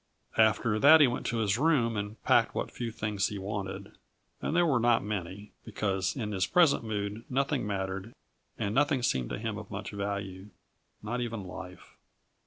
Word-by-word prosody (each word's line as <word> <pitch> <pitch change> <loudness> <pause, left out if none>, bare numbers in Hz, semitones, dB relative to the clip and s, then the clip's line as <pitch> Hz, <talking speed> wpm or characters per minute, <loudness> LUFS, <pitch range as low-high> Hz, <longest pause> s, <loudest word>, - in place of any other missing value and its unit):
After 110 0 +3
that 155 +5 +8
he 150 - +8
went 125 -1 -2
to 115 - -1
his 105 0 +1
room 135 -7 +2
and 105 +1 -4
packed - - +3
what - - -2
few 120 -1 -4
things 105 -3 -1
he 105 - -5
wanted; 100 0 -5 0.5
and - - -2
they 175 - +5
were 145 -7 +3
not 120 0 +3
many, 100 0 -5
because 100 -4 -1
in 110 -6 -3
his 95 -2 0
present 170 -8 +4
mood 105 0 -3
nothing 135 -2 0
mattered 95 +1 -3 0.5
and 100 - -2
nothing 140 -1 +2
seemed 65 - 0
to - - -3
him 110 0 -4
of 105 - -10
much 105 +2 -6
value 100 -1 -4 0.5
not 120 +4 -2
even 115 -4 -4
life. 90 0 -10
105 Hz, 180 wpm, -29 LUFS, 100-120 Hz, 0.5 s, that